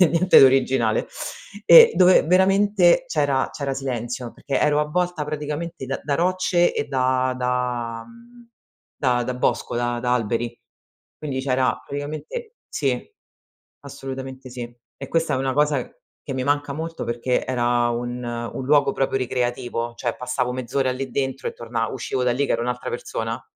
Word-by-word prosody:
nie 180 - +7
niente 175 +3 +3
di - - +9
originale 130 -4 +2 0.6
e 475 -1 +9
dove 185 0 +6
veramente 195 +4 +4
c'era 145 - +1
c'era 140 -2 -3
silenzio 125 -2 -4
perché 140 - -2
ero 150 0 +3
avvolta 175 +1 -1
praticamente 150 +1 -5
da 135 +1 -3
da 145 - -1
rocce 175 +1 +2
e - - -1
da 130 -2 0
da 125 -2 -2
mhmm, 235 0 -17 0.5
da 125 -3 +1
da 125 - -3
bosco, 125 - -1
da 120 0 -1
da 125 0 0
alberi, 120 0 -1 0.6
quindi 140 -4 -3
c'era 130 -1 0
praticamente 155 - -6
sì, - - -1 0.8
assolutamente 135 -1 -8
sì 120 -1 -7 0.2
e - - -7
questa 165 0 +1
è 130 - +1
una 135 0 0
cosa 145 -2 +2 0.4
che 135 - -6
mi 130 - -2
manca 145 0 0
molto 165 +3 -5
perché 120 +2 -1
era 120 -1 +1
un 120 +1 -3
un 120 +2 -5
luogo 140 0 +4
proprio 135 0 0
ricreativo, 120 -2 -2
cioè 120 0 -2
passavo 125 0 -2
mezz'ora 130 +1 -1
lì 130 +1 -4
dentro 135 0 -2
e - - -4
torna 115 -1 -3
uscivo 130 0 -3
da 125 - +2
lì 140 +4 0
che - - -1
ero 115 - -1
un'altra 125 +1 -3
persona. 115 -1 -4
130 Hz, 160 wpm, -23 LUFS, 125-150 Hz, 0.8 s, di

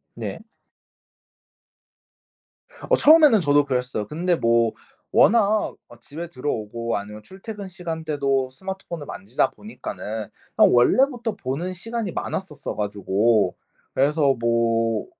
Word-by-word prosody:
네. - - -5 2.5
어 - - +6
처음에는 300 -8 +7
저도 145 -3 +3
그랬어요. 125 -5 -2
근데 175 - 0
뭐 115 -3 +2 0.4
워낙 215 -1 +3
어 - - -15
집에 165 +4 -8
들어오고 115 -5 -3
아니면 105 +1 -7
출퇴근 200 - -9
시간 170 -3 -6
때도 135 -4 0
스마트폰을 170 +1 -7
만지다 120 +6 -1
보니까는 110 - -7 0.3
그냥 - - +6
원래부터 235 - +3
보는 165 +3 -3
시간이 220 +2 -4
많았었어 185 -7 -5
가지고 105 0 +1 0.4
그래서 140 0 +3
뭐 115 -1 +1
145 Hz, 270 characters per minute, -23 LUFS, 115-190 Hz, 2.5 s, 처음에는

